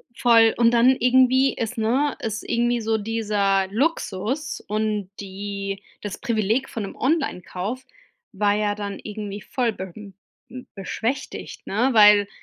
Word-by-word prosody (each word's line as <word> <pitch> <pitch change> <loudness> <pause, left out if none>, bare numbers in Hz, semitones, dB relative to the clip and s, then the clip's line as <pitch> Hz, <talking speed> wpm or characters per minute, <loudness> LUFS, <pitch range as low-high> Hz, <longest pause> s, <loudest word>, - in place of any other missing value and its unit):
Voll, 230 -2 +5
und 235 -1 +4
dann 240 +2 +5
irgendwie 260 +2 +4
ist, 230 +2 -4
ne 255 +6 +1
ist 220 0 -3
irgendwie 240 0 +1
so 220 0 0
dieser 205 -3 0
Luxus 260 - -2
und 210 -2 -1
die 200 0 -5 0.2
das 205 -2 -5
Privileg 230 +1 0
von 225 - -4
'nem 195 - -7
Online-Kauf 255 - -2 0.5
war 205 0 +1
ja 210 -1 0
dann 205 -1 -5
irgendwie 210 -1 -6
voll 240 0 -1
be 190 -2 -7
hm, 205 -2 -11 0.6
beschwächtigt, 225 +6 -4
ne, 230 +7 +1
weil 210 -2 +7
220 Hz, 135 wpm, -23 LUFS, 205-245 Hz, 0.6 s, weil